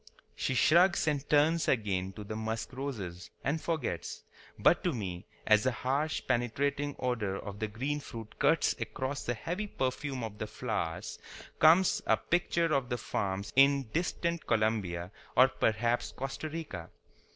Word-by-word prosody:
She 130 Hz, -, -1 dB
shrugs 170 Hz, +4 st, +5 dB
and 145 Hz, -2 st, 0 dB
turns 155 Hz, +3 st, +4 dB
again 95 Hz, -6 st, 0 dB
to 105 Hz, -, -8 dB
the 110 Hz, +1 st, -6 dB
musk 110 Hz, +2 st, -3 dB
roses, 105 Hz, -11 st, -5 dB
and 155 Hz, +3 st, 0 dB
forgets. 160 Hz, -7 st, -3 dB, 0.3 s
But -, -, +4 dB
to -, -, +1 dB
me, 95 Hz, -5 st, -5 dB, 0.2 s
as 110 Hz, -1 st, +5 dB
the 130 Hz, -, +1 dB
harsh, 135 Hz, +6 st, -1 dB
penetrating 140 Hz, +4 st, 0 dB
odor 115 Hz, -7 st, -1 dB
of 100 Hz, 0 st, -7 dB
the 110 Hz, -, -1 dB
green 135 Hz, +8 st, -2 dB
fruit 115 Hz, -6 st, -9 dB
cuts -, -, +3 dB
across 130 Hz, +2 st, -3 dB
the 120 Hz, -, -1 dB
heavy 180 Hz, -, -3 dB
perfume 130 Hz, -, -2 dB
of 105 Hz, -2 st, -6 dB
the 110 Hz, -, -3 dB
flowers, 105 Hz, -7 st, -3 dB, 0.4 s
comes 165 Hz, +3 st, +6 dB
a -, -, +5 dB
picture 170 Hz, -2 st, +1 dB
of 135 Hz, -3 st, +1 dB
the 120 Hz, -, -1 dB
farms 100 Hz, -3 st, -3 dB
in 135 Hz, -2 st, +5 dB
distant 170 Hz, 0 st, -1 dB
Colombia 105 Hz, -6 st, 0 dB, 0.3 s
or 130 Hz, +1 st, +8 dB
perhaps 115 Hz, +1 st, 0 dB
Costa 135 Hz, +4 st, -5 dB
Rica. 145 Hz, -, -6 dB
125 Hz, 150 wpm, -31 LUFS, 110-145 Hz, 0.4 s, or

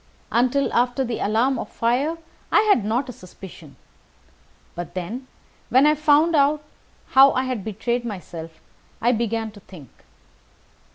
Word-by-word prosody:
Until 255 Hz, +4 st, +1 dB
after 245 Hz, +2 st, +1 dB
the 235 Hz, -2 st, -3 dB
alarm 230 Hz, +5 st, +1 dB
of -, -, -6 dB
fire, 265 Hz, +8 st, 0 dB, 0.3 s
I -, -, +5 dB
had 415 Hz, -, +3 dB
not 235 Hz, +6 st, -1 dB
a -, -, -6 dB
suspicion. 180 Hz, -6 st, -13 dB, 1.0 s
But 175 Hz, +1 st, -7 dB
then, 225 Hz, +9 st, -5 dB, 0.4 s
when 260 Hz, +3 st, +5 dB
I 300 Hz, -, +5 dB
found 305 Hz, +2 st, +3 dB
how 280 Hz, -2 st, +2 dB
I 255 Hz, -, 0 dB
had 255 Hz, -6 st, -3 dB
betrayed 235 Hz, +4 st, -2 dB
myself, 170 Hz, -7 st, -8 dB, 0.4 s
I 240 Hz, -, +2 dB
began 225 Hz, -1 st, -2 dB
to 205 Hz, -, -14 dB
think. 165 Hz, -, -14 dB
240 Hz, 135 wpm, -22 LUFS, 205-275 Hz, 1.0 s, I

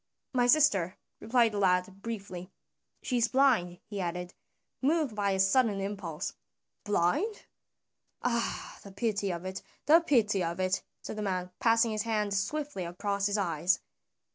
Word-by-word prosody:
"My 245 Hz, -1 st, +3 dB
sister," 205 Hz, -, +4 dB, 0.2 s
replied 230 Hz, 0 st, +3 dB
the 205 Hz, -, -2 dB
lad 190 Hz, 0 st, +1 dB
briefly. 195 Hz, -5 st, -6 dB, 0.5 s
"She 250 Hz, -, 0 dB
is 235 Hz, -1 st, +3 dB
blind," 240 Hz, -11 st, +3 dB
he 205 Hz, -2 st, -5 dB
added, 180 Hz, 0 st, -4 dB, 0.5 s
moved 295 Hz, -2 st, +2 dB
by 205 Hz, -1 st, +1 dB
a 190 Hz, -1 st, 0 dB
sudden 200 Hz, +1 st, +3 dB
impulse. 195 Hz, -5 st, -4 dB, 0.5 s
"Blind? 205 Hz, -, 0 dB, 0.8 s
Ah, 235 Hz, -1 st, -2 dB
the 200 Hz, -, -11 dB
pity 200 Hz, 0 st, -1 dB
of 175 Hz, 0 st, -4 dB
it, 190 Hz, +1 st, -5 dB, 0.2 s
the 320 Hz, +3 st, +7 dB
pity 215 Hz, -, +2 dB
of 170 Hz, +2 st, -3 dB
it!" 185 Hz, 0 st, +1 dB, 0.2 s
said -, -, -6 dB
the -, -, -2 dB
man, 185 Hz, -3 st, -2 dB
passing 230 Hz, 0 st, +4 dB
his 215 Hz, -1 st, -1 dB
hand 210 Hz, -2 st, 0 dB
swiftly 200 Hz, +2 st, -2 dB
across 200 Hz, +3 st, -1 dB
his 205 Hz, +1 st, 0 dB
eyes. 175 Hz, -2 st, +1 dB
200 Hz, 150 wpm, -30 LUFS, 185-235 Hz, 0.8 s, the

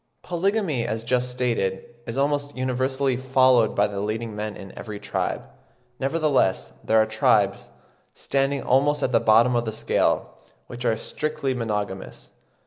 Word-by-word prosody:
Polygamy, 180 Hz, -, 0 dB
as 110 Hz, +1 st, -3 dB
just 125 Hz, +1 st, 0 dB
stated, 115 Hz, -7 st, -1 dB, 0.2 s
is 115 Hz, -, -5 dB
almost 145 Hz, 0 st, 0 dB
universally 130 Hz, +1 st, 0 dB
followed 130 Hz, -2 st, +3 dB
by 105 Hz, -, +4 dB
the 100 Hz, -1 st, -4 dB
leading 110 Hz, +2 st, -3 dB
men 105 Hz, 0 st, -4 dB
in 95 Hz, -, -11 dB
every 105 Hz, -3 st, -7 dB
tribe. -, -, -2 dB, 0.6 s
Nevertheless 140 Hz, -, +1 dB
there 110 Hz, -, +3 dB
are 110 Hz, -, +4 dB
tribes, 110 Hz, 0 st, +1 dB, 0.5 s
standing 135 Hz, 0 st, -1 dB
almost 145 Hz, +3 st, +2 dB
at -, -, +1 dB
the 120 Hz, -, +4 dB
bottom 115 Hz, +3 st, +4 dB
of 120 Hz, 0 st, +1 dB
the 110 Hz, -, -2 dB
scale, 110 Hz, -, 0 dB, 0.2 s
which 120 Hz, +1 st, -8 dB
are 115 Hz, -2 st, +2 dB
strictly 155 Hz, +2 st, -2 dB
monogamous. 105 Hz, -5 st, -4 dB
125 Hz, 145 wpm, -24 LUFS, 110-135 Hz, 0.6 s, by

